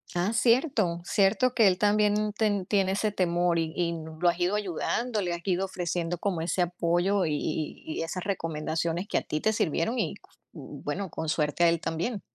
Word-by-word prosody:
Ah, 175 +4 +1
cierto 230 - +2
cierto 200 +7 +2
que 225 -5 +5
él 185 -1 +3
también 210 +1 +2
ten 205 -4 +1
tiene 190 -1 +1
ese 210 +2 0
temor 175 -2 +1
y 160 -1 -2
¿y 175 -1 0
lo 160 +1 -1
has 170 - -2
ido 180 +3 +1
ayudando?, 210 +4 -1
¿le 175 -2 -1
has 170 - -5
ido 190 0 0
ofreciendo 175 -2 -2
como 185 -1 -1
ese 170 +2 0
apoyo 175 +2 +1
y 155 - 0
y 155 +1 -3 0.2
y - - 0
esas 175 +2 -4
recomendaciones 165 -1 -2
que - - +1
a - - +1
ti 155 - -3
te 220 - +2
sirvieron?, 210 - 0
y, - - -1 0.4
bueno, 200 -2 -5
con 160 0 -5
suerte 155 +2 +1
a - - +6
él 165 -1 0
también. 190 +7 -2
180 Hz, 195 wpm, -28 LUFS, 170-205 Hz, 0.4 s, a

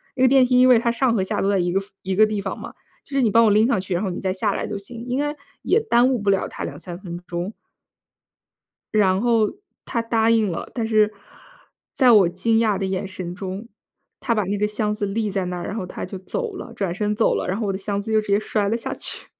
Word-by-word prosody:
那 260 - +1
个 - - +7
电 265 0 +6
梯 250 0 +3
因 255 - +7
为 245 -2 +7
它 235 0 +1
上 240 0 +1
和 190 - +1
下 190 - -2
都 - - +1
在 195 -2 +2
一 175 0 0
个 195 - +2 0.2
一 190 0 -2
个 215 - +6
地 210 -1 -2
方 195 - -4
嘛， - - -8 0.3
就 - - -24
是 270 - +3
你 230 - +3
帮 230 0 +6
我 215 - +4
拎 215 +2 +4
上 235 -6 +1
去， 185 -1 -4
然 175 - 0
后 190 - -1
你 175 - -4
再 190 -1 -1
下 200 +2 0
来 - - -2
就 210 - -4
行。 230 +4 -8
“应 250 +1 -1
该 295 +1 -1 0.3
也 - - +3
耽 245 - +3
误 260 - +1
不 200 -1 +2
了 195 - +1
他 - - -7
2-3 175 -2 -6
分 175 -3 -7
钟。 175 +4 -4 1.4
然 190 -3 +3
后 230 -2 +2 0.3
他 235 - -2
答 230 -1 +2
应 225 -2 +3
了， - - -5
但 230 -3 -2
是 215 -1 +3 0.8
在 255 -3 +5
我 200 -5 +6
惊 190 +6 +1
讶 215 -4 +2
的 195 - -1
眼 190 0 -2
神 185 -2 -6
中， 195 +4 -6 0.5
他 - - -1
把 210 - +1
那 200 +2 -2
个 210 +1 0
箱 210 0 -1
子 210 -1 -3
立 215 +2 -1
在 190 -2 -1
那 180 0 -4
儿， 175 - -5
然 - - -4
后 205 - -3
他 180 - -6
就 185 - -7
走 455 - -4
了， 245 -10 -8
转 195 -5 -2
身 210 +1 -1
走 220 - +2
了。 - - -2
然 190 - -1
后 225 - -2
我 195 - 0
的 - - -3
箱 200 0 -2
子 220 +2 -4
就 220 - +4
直 215 - -11
接 200 0 +4
摔 210 -1 -1
了 225 - +1
下 230 - -4
去。 - - -7
210 Hz, 290 characters per minute, -22 LUFS, 190-230 Hz, 1.4 s, 个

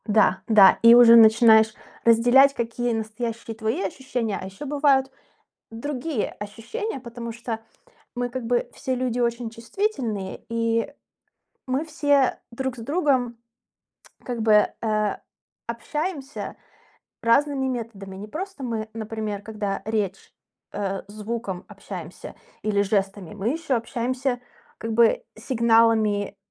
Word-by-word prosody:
Да, 205 -3 +3
да. 205 -4 +7
И 230 +1 +9
уже 235 -1 +9
начинаешь 220 -1 +7 0.3
разделять, 245 +4 +6
какие 235 -1 -2
настоящие 225 +1 -4
твои 220 -1 -2
ощущения. 230 +1 -3
А - - -6
ещё 195 +9 -8
бывают 280 -2 +2 0.6
другие 260 +1 -3
ощущения, 230 - -6
потому 235 -1 -7
что 230 -1 -5 0.6
мы 245 0 -2
как 250 -1 -5
бы 240 +1 0
все 260 -2 -3
люди 250 -1 -1
очень 235 -1 -1
чувствительные, 230 - -3
и 230 +3 0 0.8
мы 265 +4 -1
все 290 -4 +2
друг 265 +1 -3
с - - -9
другом 265 -4 +1 0.9
как 240 -3 -3
бы, 215 -1 +5 0.2
э, 215 -2 0 0.5
общаемся 285 +5 -4 0.7
разными 270 +3 +2
методами. 220 -6 -5
Не 200 +2 -7
просто 360 - -6
мы, 225 -3 -3
например, 215 -2 -4
когда 205 -2 -4
речь, 210 -3 -3 0.4
э, 195 -1 -3
звуком 210 -2 -5
общаемся 185 -5 -9 0.3
или 205 -1 +1
жестами, 195 -2 -2
мы 210 +3 -1
ещё 315 -3 -1
общаемся 245 +2 -2 0.4
как 225 0 -4
бы 235 - +4
сигналами, 225 -4 +2
230 Hz, 120 wpm, -24 LUFS, 215-255 Hz, 0.9 s, И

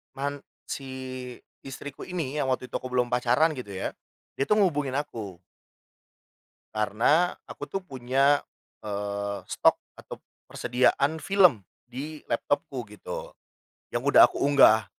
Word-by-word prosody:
man 140 +1 -3 0.2
si 135 - -6 0.7
istriku 135 +1 -8
ini, 155 -6 -3
yang 135 - 0
waktu 130 -1 -2
itu - - -1
aku 130 - -6
belum 125 -1 0
pacaran 125 +6 +3
gitu 125 -9 -7
ya. 95 - -3 0.5
Dia 135 - +1
tuh 210 - +4
ngubungin 145 -7 0
aku 110 -11 -5 1.3
karena 115 - +3 0.2
aku - - -8
tuh 195 - -1
punya, 135 -2 +2 0.4
eee, 100 -1 -3
stok - - +3 0.2
atau - - -10 0.3
persediaan 140 +5 +1
film 180 - +4 0.2
di 150 +5 -6
laptopku 130 +1 -1
gitu, 105 - -7 0.6
yang - - -3
udah - - +8
aku - - -7
unggah. 135 -7 +6
130 Hz, 130 wpm, -27 LUFS, 115-145 Hz, 1.3 s, udah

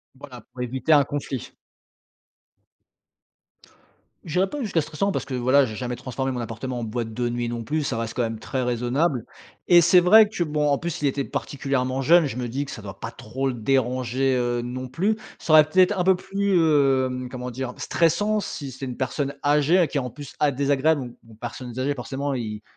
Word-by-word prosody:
Voilà, 130 -3 -11
pour 125 - -11
éviter 130 +5 -2
un 145 - +6
conflit. 140 -3 -5 2.7
J'irais 180 +4 0
pas 290 +6 -5
jusqu'à 190 -8 0
stressant 165 +6 -2
parce - - -3
que, 135 - -7
voilà, 130 +3 +4
j'ai 110 -3 -6
jamais 125 0 -4
transformé 130 +2 -3
mon 125 - -3
appartement 120 +2 -5
en - - -4
boîte 115 0 -3
de 120 +2 -2
nuit 120 0 -2
non 115 -1 -4
plus 155 +5 -1
ça 130 -4 -2
reste 115 0 -3
quand 125 - -1
même 115 -1 -2
très 130 +4 -3
raisonnable, 125 +2 0 0.4
et 175 -1 +7
c'est 175 +2 +6
vrai 210 +4 +7
que, 195 -5 -1
bon, 150 -1 0
en 140 - +3
plus 170 -3 -4
il 145 - +2
était 140 0 -1
particulièrement 135 -1 -2
jeune 170 +3 +6
je 125 - -6
me 125 - -2
dis 135 +5 -3
que - - -9
ça 110 - -8
doit 95 -1 -9
pas 115 - -5
trop 130 +4 -4
le 130 - -2
déranger, 130 +1 0
heu, 120 -1 0
non 130 +1 -5
plus. 195 +11 0 0.2
Ça 155 - 0
aurait 155 -1 +8
peut-être 185 +4 +3
un 180 - +1
peu 190 +1 +5
plus, 195 +2 -2
hem, 135 -5 +2
comment 125 -1 -5
dire? 125 +1 -5
Stressant. 205 +6 +1
Si 140 -7 -6
c'est 130 +2 -7
une 125 -2 -6
personne 140 +2 -2
âgée 150 +4 +3
à 170 - +4
qui 145 - -3
en 125 -2 -2
plus 145 +2 -10
a 150 -1 +3
désagréable, 140 +2 +1
don 120 -1 -8
une 110 - -15
personnes 120 +1 -7
âgées 140 +2 0
forcément 135 +2 -3
ils 105 -4 -4
135 Hz, 210 wpm, -24 LUFS, 125-150 Hz, 2.7 s, aurait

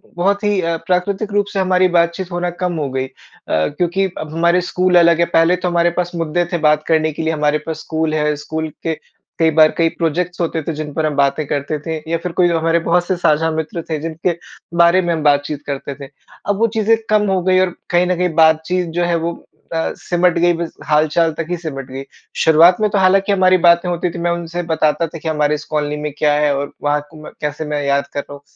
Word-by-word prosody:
बहुत 200 +4 0
ही 205 -2 +1
प्राकृतिक 180 +5 -1
रूप 205 -1 +2
से 195 - -1
हमारी 185 0 +3
बातचीत 170 +2 0
होना 175 0 -1
कम 180 -1 0
हो 145 -3 -2
गई। 130 0 -2
अ, - - -21 0.4
क्योंकि 175 - 0
अब 155 0 -6
हमारे 170 +2 +2
स्कूल 180 0 +1
अलग 170 -1 +4
है, 170 - +4
पहले 170 +1 +3
तो 180 0 -3
हमारे 175 0 +2
पास 175 -1 -1
मुद्दे 165 +1 -1
थे - - +2
बात 150 0 +2
करने 155 -1 +2
के 160 - -5
लिए 160 0 0
हमारे 150 0 +1
पास 160 -1 -4
स्कूल 160 -1 -2
है, 150 -1 +1
स्कूल 160 +2 -4
के 160 -2 -2 0.4
कई 160 0 +4
बार 155 0 +7
कई 165 -1 +3
प्राजेक्ट्स 175 +3 -2
होते 160 -1 -1
थे 165 - -1
जिन 150 -1 -6
पर 160 -1 -1
हम 150 -2 -1
बातें 140 +2 +1
करते 145 +1 -2
थे। 160 +1 -4
या 165 - +2
फिर 180 +1 -5
कोई 180 -1 +5
हमारे 165 0 +1
बहुत 175 +1 +2
से 185 - +1
साझा 160 -1 +2
मित्र 160 +2 -3
थे 155 - -1
जिनके 165 +2 -2 0.5
बारे 170 +2 +5
में 175 -1 0
हम 160 - -2
बातचीत 145 0 +1
करते 140 0 -5
थे। 140 -1 -10 0.4
अब 200 - +1
वो 230 - +3
चीज़ें 220 +1 +4
कम 210 -1 +3
हो 185 -1 +1
गई 185 0 +3
और 185 -2 +1 0.2
कहीं 175 +1 +3
न 180 - +1
कहीं 180 0 +1
बातचीत 160 +2 +3
जो 175 - +2
है 170 -1 +1
वो 170 - -1 0.4
अ, 165 - -1
सिमट 175 -1 +1
गई 175 0 +3
बस 170 -1 -4
हालचाल 155 +2 +2
तक 165 - -2
ही 175 - 0
सिमट 135 -6 -6
गई। 135 +1 -6 0.4
शुरुआत 165 +3 +6
में 210 - +3
तो 205 - 0
हालाँकि 195 +1 +3
हमारी 185 -1 +4
बातें 170 +1 +4
होती 175 0 -1
थी, 170 - -8
मैं 175 0 0
उनसे 170 0 -3
बताता 160 0 0
था 165 - -9
कि 160 - -8
हमारे 150 -1 +1
इस 150 - -8
कॉलोनी 150 0 -1
में 150 -1 -3
क्या 150 -1 +2
है 150 -1 +2
और 140 +1 -3
वहाँ 145 0 +1
कु 160 - -13
मै - - -9
कैसे 150 +1 -3
मैं 150 -1 -2
याद 140 0 0
कर - - -2
रहा 145 - -8
हूँ। 140 - -11
165 Hz, 240 wpm, -17 LUFS, 150-180 Hz, 0.5 s, बार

